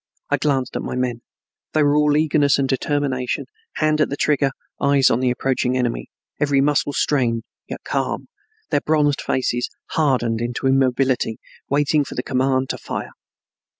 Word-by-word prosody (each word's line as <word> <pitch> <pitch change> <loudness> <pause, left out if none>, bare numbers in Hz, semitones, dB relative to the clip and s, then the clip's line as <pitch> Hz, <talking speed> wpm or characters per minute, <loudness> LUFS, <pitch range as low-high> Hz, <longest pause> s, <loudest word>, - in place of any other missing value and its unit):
I - - +4
glanced 135 -4 0
at - - -1
my - - -4
men. 125 -2 -2 0.5
They 155 - +3
were 145 0 +3
all 150 0 +3
eagerness 150 -2 +3
and 135 -1 +1
determination, 135 -2 -1 0.3
hand 155 0 +2
at - - +2
the 140 - -3
trigger, 145 -2 +2 0.3
eyes 140 -1 +4
on 115 - +2
the 130 -1 +2
approaching 130 0 0
enemy, 120 -2 -2 0.3
every 145 -2 +2
muscle 145 +1 +2
strained, 120 -7 +1 0.2
yet - - -7
calm, - - -2 0.4
their 145 - +2
bronzed 150 -2 +2
faces 125 -1 -1 0.2
hardened 125 -7 +1
into 120 +3 -3
immobility, 130 -3 +2 0.3
waiting 145 +1 +2
for - - -8
the 125 - -2
command 130 0 0
to - - -6
fire. - - -5
135 Hz, 160 wpm, -21 LUFS, 125-145 Hz, 0.5 s, I